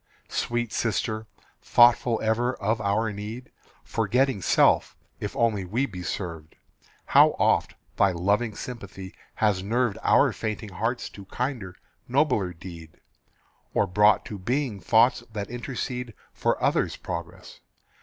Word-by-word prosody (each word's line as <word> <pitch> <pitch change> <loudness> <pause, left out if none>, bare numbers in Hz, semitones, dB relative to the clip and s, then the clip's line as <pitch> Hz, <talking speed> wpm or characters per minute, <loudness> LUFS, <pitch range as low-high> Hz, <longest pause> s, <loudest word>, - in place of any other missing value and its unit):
Sweet 120 -1 -2
sister, 110 0 -1 0.3
thoughtful 120 -1 +5
ever 120 +3 +1
of 110 +2 -1
our 105 +2 0
need, 110 +5 -7 0.3
Forgetting 130 -4 +1
self, 75 - +3 0.2
if - - -5
only 110 -4 +1
we 115 +9 0
be 95 -8 -8
served, 85 -3 -5 0.5
How - - +5
oft - - +2 0.2
thy 100 -1 +4
loving 100 +5 0
sympathy 100 -6 -8 0.2
has 105 -4 +1
nerved 115 +2 0
Our - - +4
fainting 110 0 -4
hearts 115 +6 -2
to 100 - -11
kinder, 120 -5 -4 0.3
nobler 125 -8 +2
deed, 85 -2 -11 0.8
Or - - +3
brought 105 +2 +4
to 105 - -7
being 120 +1 -1
thoughts 115 +5 +4
that 105 0 -5
intercede 125 -1 -4 0.2
For - - 0
others' - - +1
progress. - - -7
110 Hz, 125 wpm, -26 LUFS, 100-120 Hz, 0.8 s, thoughtful